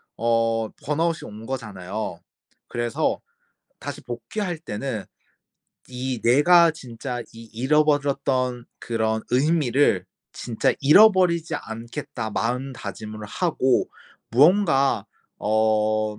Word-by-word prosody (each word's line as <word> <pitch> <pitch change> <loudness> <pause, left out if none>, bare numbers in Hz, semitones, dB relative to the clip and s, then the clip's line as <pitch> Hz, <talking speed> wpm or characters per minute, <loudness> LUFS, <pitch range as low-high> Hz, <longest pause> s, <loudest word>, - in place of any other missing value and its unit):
어 115 -1 +1 0.2
burnout이 165 +2 0
온 105 +2 -10
거잖아요. 105 -6 -5 0.5
그래서 120 +6 -1 0.6
다시 - - -6
복귀할 190 -6 -4
때는 115 -6 -4 0.8
'이 130 -1 -4
내가 165 +8 +6
진짜 125 -4 -6
이 115 0 -11
잃어버렸던 135 -2 +1
그런 110 -1 -1
의미를 135 - +2 0.3
진짜 115 -2 0
잃어버리지 175 +1 +5
않겠다.' 115 0 -6
마음 125 +5 -2
다짐을 110 -2 -7
하고 130 - +1 0.4
무언가 145 - +4 0.3
어 110 0 +1
125 Hz, 225 characters per minute, -24 LUFS, 110-150 Hz, 0.8 s, 내가